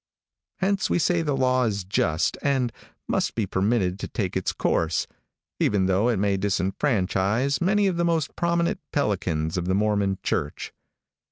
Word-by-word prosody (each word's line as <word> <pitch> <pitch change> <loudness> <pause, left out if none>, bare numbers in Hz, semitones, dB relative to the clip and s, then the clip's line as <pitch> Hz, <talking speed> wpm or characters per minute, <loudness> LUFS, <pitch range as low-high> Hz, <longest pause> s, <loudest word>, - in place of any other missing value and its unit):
Hence 195 0 0
we - - +2
say 175 0 +2
the 145 -4 -1
law 130 -1 +2
is 100 -3 -1
just 85 -3 0
and 130 -4 +1 0.3
must - - 0
be 110 - 0
permitted 95 -1 0
to - - -4
take 100 -4 -3
its 95 - 0
course, 80 0 0 0.5
even 100 -2 +2
though 95 +5 +2
it 115 - +1
may 100 0 +1
disfranchise 100 - 0
many 205 +3 +3
of 185 -3 +1
the 170 - +1
most 165 -4 0
prominent 170 0 0
pelicans 90 - -1
of 90 - -2
the 95 - +2
Mormon 100 -2 +1
church. 70 - -2
105 Hz, 160 wpm, -25 LUFS, 95-140 Hz, 0.5 s, many